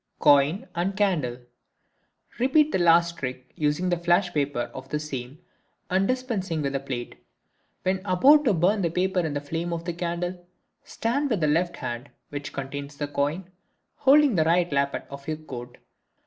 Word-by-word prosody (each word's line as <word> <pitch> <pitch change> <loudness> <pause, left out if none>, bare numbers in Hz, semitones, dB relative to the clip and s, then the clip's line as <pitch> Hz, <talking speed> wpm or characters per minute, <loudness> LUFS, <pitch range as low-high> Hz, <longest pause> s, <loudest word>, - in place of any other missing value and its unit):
Coin 145 +6 +4
and 185 +3 -2
Candle.—Repeat 185 - -2
the - - +1
last 170 0 +4
trick, 130 -1 -6
using 165 +4 +1
"flash" 175 0 +2
paper 140 -4 -1
for 130 - -6
the 150 - -1
same 135 -2 -6 0.5
and 190 +1 +2
dispensing 215 - -2
with 140 -1 -1
the 135 - 0
plate. 130 -3 -6 0.6
When 185 0 0
about 265 +11 +5
to 225 - +4
burn 190 +5 +2
the 170 - +1
paper 185 +3 0
in 160 -4 -1
the 145 - -1
flame 165 +4 -3
of 170 0 -4
the 175 - -2
candle, 175 +1 -3 0.4
stand 280 +6 -1
with 220 -6 +1
the 155 - +2
left 170 +3 +1
hand, 120 +1 -5 0.2
which 145 0 -6
contains 140 +1 -6
the 145 - -2
coin, 150 +6 -2 0.5
holding 285 -1 +5
the 165 -5 +3
right 175 +1 +2
lappet 140 0 0
of 140 0 -9
your 155 -1 -2
coat. 125 -6 -9
165 Hz, 165 wpm, -26 LUFS, 140-185 Hz, 0.6 s, about